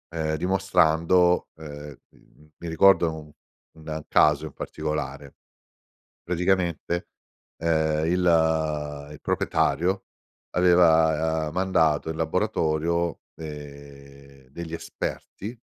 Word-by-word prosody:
uhm, 80 -1 -1
dimostrando 90 -1 +2
uhm, 75 -2 -9
mhmm, 75 0 -24
mi 85 - -8
ricordo 85 -1 +4
un 75 -1 -11 0.4
un 80 -1 -7
caso 75 0 +3
in 75 - -8
particolare. 75 -2 -5 0.9
Praticamente, 90 -1 -1 0.5
uhm, 80 -2 +1
il 80 -4 +1
il 75 - -12
proprietario 95 +4 0 0.5
aveva, 80 -3 +3
uhm, - - -7
mandato 80 -5 +1
in 80 - -5
laboratorio, 85 -1 0 0.2
ehm, 70 -3 -11
degli 85 +3 -7
esperti 105 +6 -6
80 Hz, 90 wpm, -25 LUFS, 75-85 Hz, 0.9 s, ricordo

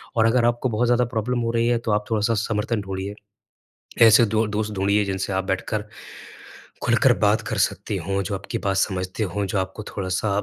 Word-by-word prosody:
और 110 -1 +3
अगर 115 +1 +3
आपको 120 +2 +1
बहुत 115 +2 0
ज़्यादा 120 0 +3
प्रॉब्लम 120 +3 0
हो 115 0 -1
रही 115 0 +1
है 120 0 +2
तो - - +2
आप 105 0 +1
थोड़ा-सा 110 +1 +1
समर्थन 105 0 -1
ढूँढ़िए। 95 +1 -5 0.9
ऐसे 115 +1 +7
2 110 +1 +1
दोस्त 105 0 -2
ढूँढ़िए 100 +2 +1
जिनसे 95 0 -3
आप 95 0 0
बैठकर 105 +3 -2 1.0
खुलकर - - +4
बात - - +3
कर - - -2
सकते - - 0
हो, 100 0 -2
जो 100 +1 -3
आपकी 95 - -5
बात 95 -1 +1
समझते 95 +2 -1
हो, 100 +1 -2
जो 95 - -2
आपको 95 +3 -4
थोड़ा-सा 95 +1 -3
105 Hz, 195 wpm, -23 LUFS, 95-115 Hz, 1.0 s, ऐसे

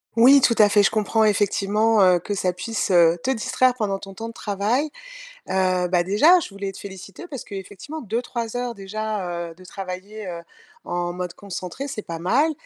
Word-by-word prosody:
Oui, 260 +5 +7
tout 235 - +4
à 210 - +7
fait. 205 0 +5
Je 200 - +4
comprends 220 +1 +1
effectivement, 210 +1 +2
heu, 180 -1 +5
que 205 - -4
ça 185 -2 0
puisse, 210 +5 -3
heu, 170 -2 +5
te - - -1
distraire 255 +1 +2
pendant 205 -5 -1
ton 195 0 -11
temps 225 +3 -6
de - - -10
travail. 220 +9 -1 0.6
Heu, 185 -1 +1
bah, 180 -1 +3
déjà, 255 - +5
je - - -6
voulais 200 -1 -5
te 190 - -12
féliciter 195 - -10
parce 275 -8 -7
que - - -12
effectivement, 205 - -7
2-3 235 +1 -3
heures 245 -1 -2
déjà, 195 -4 -4
heu, - - -14
de 185 - -16
travaillées, 195 +3 -7
heu, 170 -1 -5 0.4
en 175 0 -2
mode 180 -1 -5
concentré, 200 +6 -6
c'est 255 -6 -5
pas 170 -4 -6
mal 260 - +2
205 Hz, 200 wpm, -23 LUFS, 185-230 Hz, 0.6 s, Oui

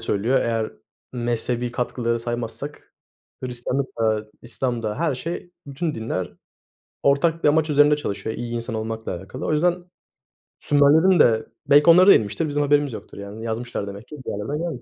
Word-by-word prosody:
söylüyor. 115 +6 +1
Eğer 115 -1 -1 0.4
mezhebi 120 0 -1
katkıları 120 -1 -1
saymazsak, 120 +4 -6 0.5
Hristiyanlık 125 +2 -2
da, 110 -1 +1 0.2
İslam 120 0 -3
da 105 -1 -2
her 160 -3 +1
şey 170 +6 -5 0.2
bütün 150 +3 -3
dinler 110 -5 -3 0.7
ortak 160 +4 +2
bir - - +6
amaç 155 +1 +2
üzerinde 145 0 +5
çalışıyor 110 -5 -4
iyi 120 0 -5
insan 115 0 -4
olmakla 110 0 -4
alakalı. 95 +1 -7
O - - 0
yüzden 175 +3 +1 0.7
Sümerlerin 155 +5 +4
de 110 -5 +4 0.2
belki 145 +3 +6
onlara 180 +3 +8
da 200 - +10
inmiştir 110 +10 0
bizim 145 0 -1
haberimiz 145 -2 +2
yoktur, - - -9
yani, 100 +2 -8
yazmışlar 115 -2 -4
demek 100 +3 -9
ki 150 - -9
bir - - -3
yerlerden. 140 +6 -4
125 Hz, 160 wpm, -23 LUFS, 115-150 Hz, 0.7 s, da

